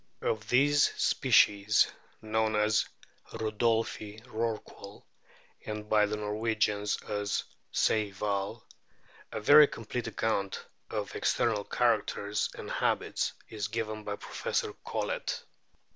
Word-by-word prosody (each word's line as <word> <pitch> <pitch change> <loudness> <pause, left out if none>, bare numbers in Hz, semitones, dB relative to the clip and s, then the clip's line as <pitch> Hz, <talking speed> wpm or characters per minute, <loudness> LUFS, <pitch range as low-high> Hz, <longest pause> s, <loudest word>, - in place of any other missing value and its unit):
Of 110 -1 -1
this 145 +3 +5
species, 100 +1 +4 0.4
known 110 0 +1
as 105 0 +2 0.4
Rudolphi's 110 0 -1
Rorqual, 110 -3 -5 0.6
and 105 -1 -5
by 105 -1 +4
the 105 +1 -2
Norwegians 105 -1 0
as 105 -2 -2 0.3
Sejhval, 100 -2 0 0.7
a - - -3
very 145 +7 +8
complete 115 0 -5
account 100 -3 -1 0.2
of - - -4
external 110 -3 +1
characters 105 -3 0
and - - -7
habits - - 0 0.2
is 105 -2 -3
given 110 0 -3
by 105 -1 -3
Professor - - -2
Collett. - - -3
110 Hz, 100 wpm, -30 LUFS, 105-110 Hz, 0.7 s, very